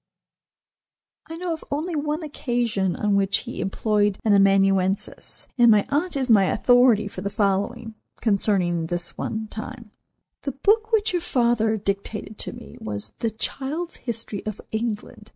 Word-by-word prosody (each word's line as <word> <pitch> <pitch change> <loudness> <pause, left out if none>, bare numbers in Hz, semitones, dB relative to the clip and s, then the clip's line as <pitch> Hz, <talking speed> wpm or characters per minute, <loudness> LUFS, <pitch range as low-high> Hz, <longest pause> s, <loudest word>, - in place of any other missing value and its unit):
I 325 - -7
know 350 -1 -2
of 315 - -7
only 315 +4 -2
one 300 +2 -2
occasion 240 - -1
on 210 -1 0
which 195 0 +2
he - - -5
employed 205 +1 +1
an 215 - +4
amanuensis, 195 -1 +2
and 240 -1 +7
my 210 -2 +5
aunt 300 +3 0
is 265 -2 0
my 210 -5 +6
authority 245 0 +4
for 185 - -7
the 200 - -2
following, 210 +3 -1 0.3
concerning 190 -6 +1
this 175 0 -1
one 220 0 -3
time: 225 0 -8 0.5
"The 275 - -3
book 440 - +2
which 440 -3 +2
your 355 - +1
father 235 -6 +2
dictated 205 +1 -4
to - - -1
me 240 -1 -11
was 105 0 -5
'The 230 - 0
Child's 280 +9 -4
History 225 -4 -4
of 215 -1 -4
England. 220 -1 -4
220 Hz, 150 wpm, -24 LUFS, 200-265 Hz, 0.5 s, and